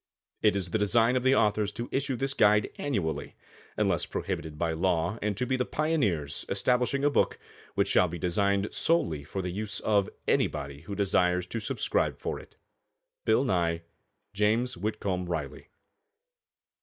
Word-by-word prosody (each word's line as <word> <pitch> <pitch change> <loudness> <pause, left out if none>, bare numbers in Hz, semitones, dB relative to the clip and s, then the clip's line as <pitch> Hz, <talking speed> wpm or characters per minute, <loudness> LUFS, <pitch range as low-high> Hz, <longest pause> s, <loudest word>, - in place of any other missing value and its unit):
It 105 -2 +4
is 90 -3 -2
the 110 - +1
design 115 +4 +3
of 130 - +2
the 130 +2 +4
authors 105 -1 +2
to 120 - -4
issue 135 0 0
this 135 +3 -1
guide 105 -4 +4
annually 100 - -2 0.4
unless - - +1
prohibited 75 -1 -4
by 85 +1 0
law, 85 +4 0
and 105 -2 -1
to 125 - 0
be 130 - 0
the 125 - +1
pioneers 125 - 0
establishing 125 +2 +1
a 145 - +5
book - - +2 0.4
which - - +2
shall 90 - +4
be 85 +1 -5
designed 100 +3 0
solely 85 - +1
for 95 +6 -4
the 90 - -3
use 100 +1 -3
of 100 -2 +2 0.2
anybody 70 -1 0
who 100 +5 -6
desires 90 -2 +2
to 115 +5 -4
subscribe - - -1
for - - -4
it. - - -16 0.7
BILL - - +4
NYE. 85 -7 0 0.5
JAMES 110 +5 +1
WHITCOMB 95 -2 -2
RILEY. 75 -5 -4
100 Hz, 160 wpm, -28 LUFS, 85-120 Hz, 0.7 s, a